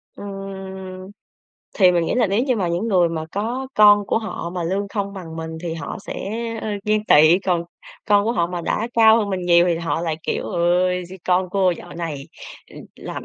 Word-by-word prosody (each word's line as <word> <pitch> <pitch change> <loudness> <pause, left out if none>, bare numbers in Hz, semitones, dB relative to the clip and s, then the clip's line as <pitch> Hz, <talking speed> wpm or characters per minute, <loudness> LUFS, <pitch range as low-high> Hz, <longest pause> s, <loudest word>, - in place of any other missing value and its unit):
Ừm. 190 -1 -8 0.7
Thì 185 -3 +7
mình 170 -1 +1
nghĩ - - -1
là 245 -3 +3
nếu 200 +4 +1
như 255 -3 +1
mà 185 -5 -1
những 175 +7 -1
người 180 -5 +3
mà 160 -1 -4
có 235 +6 -3
con 205 -1 +6
của - - +1
họ 215 -6 -5
mà 180 0 -4
lương 195 +4 -2
không 200 -1 -3
bằng 170 -5 -8
mình, 160 0 -6
thì 170 -2 -3
họ 165 - -6
sẽ, - - -4 0.5
ơ, - - -3 0.2
ghen 215 0 +1
tị. 155 0 +6
Còn 180 -3 0 0.4
con 205 -1 +3
của 230 - +1
họ 170 -8 +1
mà 175 0 -4
đã 215 +6 -2
cao 225 -1 +6
hơn 205 -3 -1
mình 190 -1 -2
nhiều, 170 0 +5
thì 170 -2 +1
họ 165 -2 -2
lại 165 -2 -2
kiểu: - - -2
"Ôi, 180 0 +1
d - - -12
con 185 0 +1
cô 190 -1 +2
dạo 175 0 -7
này, 155 -5 -5 0.4
ừm, - - -11 0.2
làm - - -7
185 Hz, 220 wpm, -21 LUFS, 170-205 Hz, 0.7 s, Thì